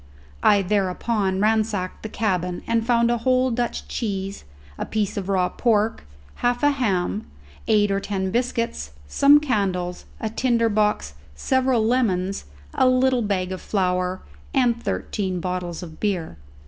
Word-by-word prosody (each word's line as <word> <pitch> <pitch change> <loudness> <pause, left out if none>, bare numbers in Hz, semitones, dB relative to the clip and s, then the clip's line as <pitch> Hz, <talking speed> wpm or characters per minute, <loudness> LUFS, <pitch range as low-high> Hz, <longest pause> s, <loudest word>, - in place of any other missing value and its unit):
I 200 -1 +5
thereupon 195 0 0
ransacked 215 -3 0
the 220 - -6
cabin, 180 -5 -1
and 230 -1 +1
found 235 0 +3
a 240 - 0
whole 255 +1 +2
Dutch 240 0 -2
cheese, 195 - -4 0.3
a - - -1
piece 210 -3 -2
of 200 -1 -4
raw 185 -2 +2
pork, 220 - 0 0.3
half 245 +1 0
a 290 - +5
ham, 185 - -1 0.4
eight 205 -2 +3
or 195 - +1
ten 190 -2 -2
biscuits, 230 - -2
some 285 - +6
candles, 190 -10 -1
a 220 - -3
tinder 230 -1 +2
box, 210 - +1 0.2
several 255 - +1
lemons, 195 -6 0 0.3
a 255 - +4
little 255 0 +3
bag 190 -4 -1
of 185 - -5
flower, 185 -2 -1 0.3
and 240 -3 +2
thirteen 190 -6 -2
bottles 180 -1 -4
of 160 -2 -10
beer. 185 - -2
210 Hz, 145 wpm, -23 LUFS, 185-235 Hz, 0.4 s, some